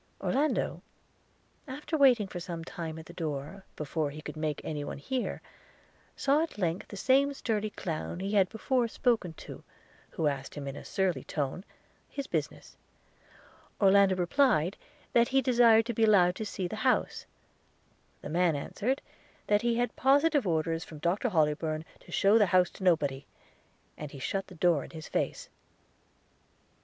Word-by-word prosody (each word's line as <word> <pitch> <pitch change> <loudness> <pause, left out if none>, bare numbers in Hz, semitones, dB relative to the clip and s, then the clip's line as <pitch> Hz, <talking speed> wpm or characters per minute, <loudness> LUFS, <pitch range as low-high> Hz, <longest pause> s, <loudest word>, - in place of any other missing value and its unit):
Orlando, 295 +4 0 0.9
after 290 +4 -4
waiting 255 -8 +5
for 180 - -6
some 170 -1 -6
time 165 -2 -6
at 160 - -9
the 170 - -12
door, 160 +3 -5
before 150 0 -2
he 150 +2 -9
could 150 - -7
make 155 -1 -2
any 150 -2 -4
one - - -5
hear, 255 - -3 0.7
saw 280 +3 +2
at 330 - -4
length 175 -2 -1
the 200 - -9
same 275 +6 +3
sturdy 215 -4 -1
clown 170 -3 -5
he 195 +2 -3
had 195 -3 +3
before 245 +2 0
spoken 225 -7 0
to, - - -11 0.5
who 160 - -3
asked 140 -2 -2
him 145 -2 -6
in 135 - -5
a - - -8
surly 180 -9 -1
tone 145 +5 -3 0.5
his 280 - -5
business. - - -4 0.5
– - - -27
Orlando 195 -1 +5
replied, 180 - +2 0.4
that 235 0 +5
he 270 - +3
desired 235 -3 +5
to 240 - -2
be 225 - +1
allowed 185 -5 +5
to 220 - -4
see 185 -2 -3
the - - -6
house. - - 0 1.0
The - - -6
man 170 0 +2
answered, 240 - -2 0.4
that 205 0 +3
he 235 -1 +1
had 245 +1 -1
positive 285 -1 +3
orders 165 0 0
from 155 - -11
Dr 175 +10 0
Hollybourn 155 -2 0
to - - -16
shew 205 +3 +4
the 205 - +4
house 180 0 +3
to - - -10
nobody; 145 -7 +1 0.7
and 150 - -5
he 140 - -10
shut 195 +9 -3
the 185 - -12
door 165 -3 +2
in - - -10
his 160 -1 -9
face. - - -2
185 Hz, 170 wpm, -30 LUFS, 160-235 Hz, 1.0 s, waiting